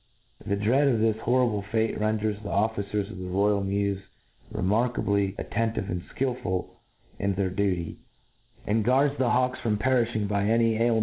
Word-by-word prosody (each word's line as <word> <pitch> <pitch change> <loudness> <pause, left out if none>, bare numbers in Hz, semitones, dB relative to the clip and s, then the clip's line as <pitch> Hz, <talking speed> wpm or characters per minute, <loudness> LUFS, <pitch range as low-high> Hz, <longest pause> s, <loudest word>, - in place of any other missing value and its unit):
The 100 -1 0
dread 120 +8 +3
of 120 -5 +2
this 110 0 +2
horrible 120 -3 +2
fate 110 +2 -1
renders 110 -1 0
the 105 - -6
officers 100 -1 -1
of - - -8
the 90 - -5
royal 100 +2 +2
mews 100 0 -1 0.5
remarkably 100 -1 +1
attentive 115 -3 -2
and 90 0 -2
Ikilful 115 -5 -2 0.5
in 100 -1 0
their 95 -1 0
duty, 95 -4 -1 0.7
and 110 +2 +1
guards 135 +5 +3
the 130 -2 +2
hawks 125 +1 +1
from 115 -4 0
perifhing 120 -3 +1
by 100 0 0
a 115 +2 +3
py 115 -1 +3
ailm. 115 -1 +3
105 Hz, 165 wpm, -27 LUFS, 100-115 Hz, 0.7 s, dread